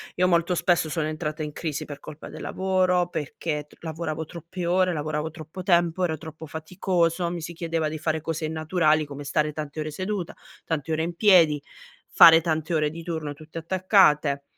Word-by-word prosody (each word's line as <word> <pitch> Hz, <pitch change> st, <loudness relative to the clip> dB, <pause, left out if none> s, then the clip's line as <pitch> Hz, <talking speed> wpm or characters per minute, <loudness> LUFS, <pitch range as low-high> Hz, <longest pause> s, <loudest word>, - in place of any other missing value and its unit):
io 180 Hz, +1 st, +3 dB
molto 170 Hz, 0 st, +2 dB
spesso 175 Hz, -2 st, +2 dB
sono 155 Hz, -2 st, -1 dB
entrata 155 Hz, 0 st, -4 dB
in 150 Hz, -1 st, -3 dB
crisi 150 Hz, -1 st, -4 dB
per 145 Hz, -1 st, -8 dB
colpa 150 Hz, -, -10 dB
del -, -, -9 dB
lavoro, 185 Hz, -2 st, +1 dB
perché 150 Hz, 0 st, -4 dB
tr -, -, -21 dB
lavoravo 160 Hz, -1 st, -4 dB
troppe 170 Hz, +2 st, -6 dB
ore, 180 Hz, +1 st, +2 dB
lavoravo 155 Hz, 0 st, -2 dB
troppo 160 Hz, +3 st, -9 dB
tempo, 175 Hz, -1 st, +2 dB
ero 160 Hz, -3 st, 0 dB
troppo 160 Hz, 0 st, -9 dB
faticoso, 170 Hz, +2 st, -1 dB
mi 175 Hz, -1 st, -4 dB
si 165 Hz, +2 st, -6 dB
chiedeva 165 Hz, -2 st, -2 dB
di 155 Hz, -, -5 dB
fare 155 Hz, 0 st, -1 dB
cose 160 Hz, 0 st, -3 dB
innaturali, 155 Hz, 0 st, +1 dB
come 145 Hz, 0 st, -8 dB
stare 150 Hz, +2 st, 0 dB
tante 150 Hz, 0 st, -6 dB
ore 155 Hz, 0 st, -2 dB
seduta, 185 Hz, +3 st, -4 dB, 0.3 s
tante 160 Hz, -1 st, -3 dB
ore 160 Hz, 0 st, 0 dB
in 170 Hz, +1 st, -3 dB
piedi, 170 Hz, -7 st, +5 dB, 0.5 s
fare 165 Hz, 0 st, +9 dB
tante 160 Hz, 0 st, -1 dB
ore 150 Hz, -1 st, +1 dB
di 165 Hz, +2 st, -8 dB
turno 160 Hz, -3 st, -4 dB
tutte 155 Hz, +2 st, -12 dB
attaccate 165 Hz, -5 st, +3 dB
160 Hz, 185 wpm, -25 LUFS, 155-175 Hz, 0.5 s, fare